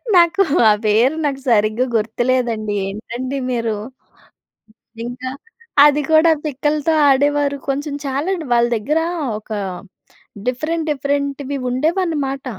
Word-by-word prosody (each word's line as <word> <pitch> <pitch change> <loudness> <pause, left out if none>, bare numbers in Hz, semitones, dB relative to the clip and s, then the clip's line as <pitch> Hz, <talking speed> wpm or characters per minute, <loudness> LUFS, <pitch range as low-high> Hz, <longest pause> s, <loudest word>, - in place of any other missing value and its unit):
నాకు 350 +3 +5 0.3
ఆ - - +6
పేరు 230 +7 +3
నాకు 275 -2 -2
సరిగ్గా 215 +2 +2
గుర్తులేదండి. 225 -1 0
ఏంటండి 240 +6 -5
మీరు. 230 -3 -1 1.3
ఇంకా 250 +2 -5 0.6
అది 295 0 +3
కూడా 315 +1 +6
పిక్కలతో 300 +2 0 0.2
ఆడేవారు. 285 +1 +2
కొంచెం 285 +2 -2
చాలాండి 315 +5 -2
వాళ్ళ 235 0 +4
దగ్గర 290 +9 0 0.4
ఒక 215 - -19 1.0
డిఫరెంట్ 310 +6 -2
డిఫరెంట్‌వి 280 -1 -2
ఉండేవన్నమాట. 295 -1 -1
275 Hz, 100 wpm, -19 LUFS, 240-300 Hz, 1.3 s, ఆ